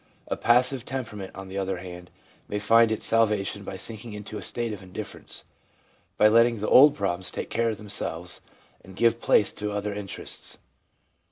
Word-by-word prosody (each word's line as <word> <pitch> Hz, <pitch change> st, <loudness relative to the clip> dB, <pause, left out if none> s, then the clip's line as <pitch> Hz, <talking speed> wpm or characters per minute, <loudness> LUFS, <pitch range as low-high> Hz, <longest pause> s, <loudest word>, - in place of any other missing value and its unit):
A -, -, 0 dB
passive 125 Hz, +1 st, +3 dB
temperament, 110 Hz, -8 st, -6 dB
on 95 Hz, 0 st, -8 dB
the 95 Hz, +1 st, -4 dB
other 95 Hz, -1 st, -2 dB
hand, 90 Hz, 0 st, -9 dB, 0.4 s
may 105 Hz, -, -3 dB
find 115 Hz, +2 st, +4 dB
its 110 Hz, -, 0 dB
salvation 105 Hz, -3 st, +1 dB
by 95 Hz, -, -6 dB
sinking 110 Hz, +3 st, -4 dB
into 105 Hz, +1 st, -7 dB
a -, -, -8 dB
state 115 Hz, +2 st, -2 dB
of 100 Hz, -, -8 dB
indifference, 90 Hz, -1 st, -8 dB, 0.7 s
by 105 Hz, -, +6 dB
letting 115 Hz, +1 st, +4 dB
the 105 Hz, -, -2 dB
old 145 Hz, +2 st, +8 dB
problems 95 Hz, -2 st, -2 dB
take -, -, -6 dB
care 115 Hz, 0 st, +1 dB
of 110 Hz, -, -3 dB
themselves 90 Hz, -4 st, -3 dB, 0.4 s
and 95 Hz, +1 st, -13 dB
give 115 Hz, +2 st, +2 dB
place 105 Hz, -, +4 dB
to 105 Hz, 0 st, -4 dB
other 105 Hz, 0 st, -3 dB
interests. 100 Hz, -2 st, -5 dB
105 Hz, 175 wpm, -26 LUFS, 95-115 Hz, 0.7 s, old